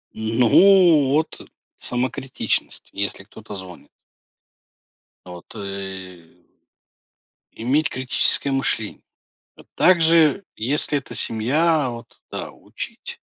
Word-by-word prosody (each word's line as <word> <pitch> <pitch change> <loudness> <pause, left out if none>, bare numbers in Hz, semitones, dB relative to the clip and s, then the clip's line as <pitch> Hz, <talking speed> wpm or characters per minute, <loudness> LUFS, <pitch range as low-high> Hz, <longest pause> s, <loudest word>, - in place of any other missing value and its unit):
Н 110 +1 -3
ну 170 - +6
вот, 155 +2 -1 0.4
самокритичность, 130 +1 -3
если 100 0 -3
кто-то 105 0 -11
звонит. 95 -2 -10 1.4
Вот, 90 +3 -11
э 95 -4 -8 1.1
иметь 145 +7 0
критическое 130 +1 +1
мышление. 135 -5 -1 0.5
А - - -15
также, 165 -1 +4
если 145 +5 0
это 120 -3 -10
семья, 140 +8 +1
вот 120 -1 -10
да, - - -5
учить. - - -9
125 Hz, 90 wpm, -21 LUFS, 100-150 Hz, 1.4 s, ну